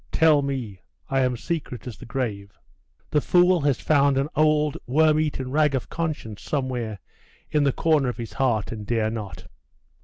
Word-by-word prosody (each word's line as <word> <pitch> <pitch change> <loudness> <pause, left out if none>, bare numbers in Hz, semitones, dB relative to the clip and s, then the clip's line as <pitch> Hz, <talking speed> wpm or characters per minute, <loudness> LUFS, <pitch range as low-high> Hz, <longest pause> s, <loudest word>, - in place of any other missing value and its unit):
Tell 155 -3 +4
me. 125 -9 -4 0.3
I 135 - +2
am 125 -2 +1
secret 130 -5 -4
as 125 -4 -6
the - - -12
grave!' 105 -6 -4 0.5
'The 150 -1 +3
fool 180 +1 +4
has 140 -3 +1
found 140 -3 +3
an 140 +2 0
old 150 -1 +3
worm 155 +4 +4
eaten 135 -4 -2
rag 150 -1 +2
of 130 - -3
conscience 150 -11 -4
somewhere 125 -6 -3 0.5
in 150 -2 +2
the 140 - +3
corner 150 -3 +2
of 120 - -5
his 115 -2 -6
heart, 120 -6 0
and 110 -2 -6
dare 110 -2 0
not. 105 -4 -7
135 Hz, 175 wpm, -24 LUFS, 115-150 Hz, 0.5 s, Tell